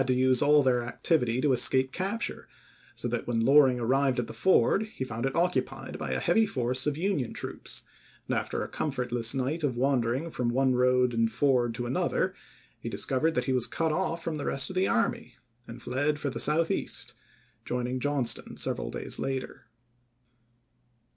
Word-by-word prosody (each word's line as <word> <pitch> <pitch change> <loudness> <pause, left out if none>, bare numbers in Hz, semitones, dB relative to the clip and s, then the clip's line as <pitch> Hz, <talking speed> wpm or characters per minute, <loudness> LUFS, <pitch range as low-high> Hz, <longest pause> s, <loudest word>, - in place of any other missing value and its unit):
to 130 - +2
use 130 0 +3
all 145 0 +5
their 125 -2 +2
activity 120 0 0
to 140 0 +2
escape 130 +1 +3
capture, 195 +8 -3 0.5
so - - -2
that, - - -3
when 120 -1 0
Loring 130 +1 +5
arrived 130 +2 +1
at 120 - 0
the - - -9
ford, 195 +3 +3
he 215 - -6
found 115 0 -3
it 135 - -3
occu 180 +2 +2
pied - - -9
by - - -4
a - - -1
heavy 225 -1 +2
force 130 -4 -1
of 150 -1 -1
Union 170 - -1
troops, - - -5 0.4
and - - -1
after - - -2
a - - -5
comfortless 125 -4 -1
night 140 +5 -2
of 130 -5 -1
wandering 130 +3 0
from 125 -4 -1
one 130 +2 +2
road 125 0 +2
and 115 -1 +1
ford 125 -2 +1
to 120 - -4
another 125 +2 0 0.5
he - - -5
discovered 155 +5 +1
that 125 - +1
he 130 - -1
was 125 -2 +2
cut 165 -1 -1
off 165 0 -2
from 160 -2 -3
the 145 - -5
rest 135 +6 +1
of - - -9
the 185 +1 +2
army 225 - -1 0.3
and 115 +1 -10
fled 145 +4 0
for 145 -2 -2
the - - -5
South 160 +3 +3
east, - - -1 0.5
joining 125 +1 -2
Johnston 135 -2 -1
several - - -2
days - - -2
later. 135 -1 -4
130 Hz, 185 wpm, -28 LUFS, 125-150 Hz, 0.5 s, all